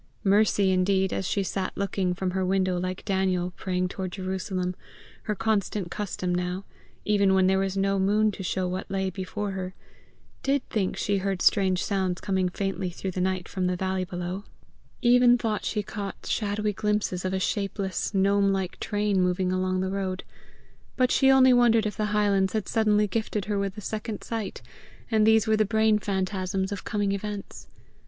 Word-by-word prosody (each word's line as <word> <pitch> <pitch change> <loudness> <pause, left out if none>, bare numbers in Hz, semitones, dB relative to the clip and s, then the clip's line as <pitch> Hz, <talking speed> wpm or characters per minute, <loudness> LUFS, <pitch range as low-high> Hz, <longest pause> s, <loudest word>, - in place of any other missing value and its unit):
Mercy, 200 -1 +3
indeed, 190 +1 +2
as 190 - -2
she 200 - 0
sat 190 0 -3
looking 190 -2 -1
from 185 0 -2
her 190 +1 -1
window 185 -1 +1
like 185 +1 -4
Daniel 185 -2 0
praying 180 -1 -1
toward 185 0 -5
Jerusalem, 185 -1 -3 0.5
her 210 - -1
constant 210 -4 -1
custom 185 -3 -2
now, 180 +2 -2 0.4
even 200 -2 +3
when 190 -1 +4
there 190 +1 +3
was 195 0 -1
no 195 0 +1
moon 210 +3 +3
to 195 - -8
show 185 0 -1
what 185 +1 -4
lay 190 -1 -1
before 200 +2 -4
her, 185 -1 -5 0.7
did 275 0 0
think 195 -4 -1
she 200 -1 0
heard 195 -1 -1
strange 190 -3 +3
sounds 190 -3 -1
come 190 -2 0
faintly 195 0 -2
through 185 +2 -5
the 185 - -3
night 185 -1 -1
from 185 -2 -1
the 180 - 0
valley 185 +1 -1
below 180 +2 -4 0.6
even 245 0 +6
thought 220 -3 -2
she 210 -2 -1
caught 200 -1 -6
shadowy 210 0 -1
glimpses 210 -3 -1
of 185 - -1
a 190 - 0
shapeless, 195 -1 -2
gnome 200 0 +3
like 190 -2 -2
train 205 -2 0
moving 180 0 +1
along 185 0 0
the 190 0 -1
road; 195 -1 -3 0.7
but 255 -1 +3
she 270 - +4
only 260 -1 +7
wondered 235 -3 +4
if 210 - -2
the 215 - -1
Highlands 205 -2 +2
had 215 -4 -1
suddenly 210 -2 +3
gifted 215 0 -2
her 205 -1 -1
with 200 -1 -2
the 210 - -7
second 215 +1 -4
sight, 225 -3 -4 0.5
and 215 -1 +4
these 220 -1 +5
were 220 -1 +2
the 215 - +4
brain 220 +1 +3
phantasms 190 -1 -2
of 200 - -4
coming 205 -2 -1
events. 200 0 -5
195 Hz, 180 wpm, -26 LUFS, 185-210 Hz, 0.7 s, only